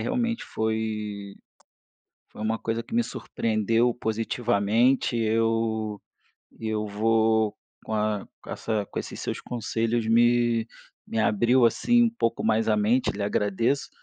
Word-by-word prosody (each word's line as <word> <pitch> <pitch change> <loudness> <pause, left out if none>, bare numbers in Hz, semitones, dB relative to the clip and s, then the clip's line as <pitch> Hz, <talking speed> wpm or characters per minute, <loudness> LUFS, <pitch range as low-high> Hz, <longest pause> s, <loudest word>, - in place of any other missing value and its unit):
realmente 235 -2 -1
foi 105 -2 -3 1.0
foi - - -11
uma 110 +1 -1
coisa 115 +1 -2
que - - -11
me 240 +1 +3
surpreendeu 115 - 0
positivamente. 115 +2 +1
Eu 110 -1 0 0.6
eu 110 -1 -2
vou 110 0 +2 0.3
com 110 - -5
a 105 -1 0 0.2
com - - -14
essa 110 -3 -2
com - - -9
esses - - -7
seus - - -4
conselhos, 115 -1 -2
me 120 0 +3 0.4
me 115 - -3
abriu 120 +4 +3
assim 240 - +3
um 235 - +3
pouco 115 - -1
mais 110 0 +2
a 105 - +3
mente 110 +5 +2
lhe 100 - -4
agradeço, 105 +7 0
110 Hz, 135 wpm, -26 LUFS, 110-120 Hz, 1.0 s, me